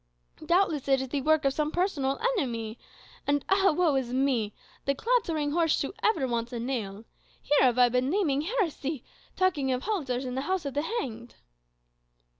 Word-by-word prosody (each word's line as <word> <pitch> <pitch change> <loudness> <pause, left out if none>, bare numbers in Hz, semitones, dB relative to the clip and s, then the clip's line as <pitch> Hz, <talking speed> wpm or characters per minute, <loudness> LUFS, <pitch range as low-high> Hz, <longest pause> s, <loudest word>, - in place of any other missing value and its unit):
Doubtless 340 -6 +1
it 270 -1 +4
is 265 -1 -4
the 280 +1 -1
work 315 +1 +2
of 275 - +3
some 300 +1 0
personal 310 -6 0 0.2
enemy. 230 - -3 0.5
And 285 -1 +1
ah, 385 0 +4
woe 325 -1 +2
is 260 -3 -1
me! 255 -5 +1 0.3
'the 275 - +1
clattering 330 - 0
horse 330 0 +2
shoe 280 - -3
ever 325 -12 +2
wants 235 0 -2
a 240 - -4
nail' 225 -4 -4 0.3
here 295 - +2
have 250 -2 +4
I 250 -1 +6
been 250 +2 +1
naming 305 -6 +1
heresy, 320 - -2 0.3
'talking 310 -8 +1
of 255 0 -1
halters 275 - -2
in 250 - -4
the 265 - -2
house 375 -4 0
of 280 - -3
the 290 - 0
hanged? 245 - -4
275 Hz, 180 wpm, -28 LUFS, 250-330 Hz, 0.5 s, I